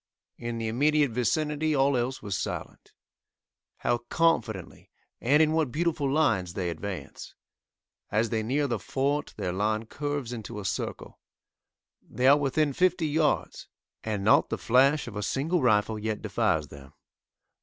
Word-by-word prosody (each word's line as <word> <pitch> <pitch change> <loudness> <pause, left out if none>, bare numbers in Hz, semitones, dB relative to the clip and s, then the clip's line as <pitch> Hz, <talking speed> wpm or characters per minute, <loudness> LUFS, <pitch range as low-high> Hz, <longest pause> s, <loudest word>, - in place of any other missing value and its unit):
In 120 -1 -4
the 115 -1 -3
immediate 145 +4 +2
vicinity 150 +5 0
all 135 0 +3
else 125 +2 -2
was 100 -2 -3
silent. - - -5 0.9
How 120 - 0
confidently, 120 - -1 0.3
and 145 +6 +4
in 155 - +2
what 160 -5 +1
beautiful 155 -3 0
lines 110 - +1
they 90 -2 -1
advance! 85 -3 -7 0.7
As 110 +1 0
they 110 -1 0
near 135 +7 0
the 120 -5 -1
fort 140 +7 -2
their 95 -4 -2
line 110 +3 0
curves 145 -1 -4
into 110 -1 -6
a 100 - -7
circle. - - -4 0.8
They 125 - -3
are 140 +2 +8
within 145 +1 +1
fifty 180 +1 +2
yards, 150 0 0 0.4
and 105 -3 -2
not 110 - +4
the - - -2
flash 135 +5 +3
of 115 - -8
a 105 - -3
single 145 - 0
rifle 110 -2 +2
yet 110 0 -3
defies 75 -2 0
them. 70 -1 -13
125 Hz, 150 wpm, -27 LUFS, 105-145 Hz, 0.9 s, are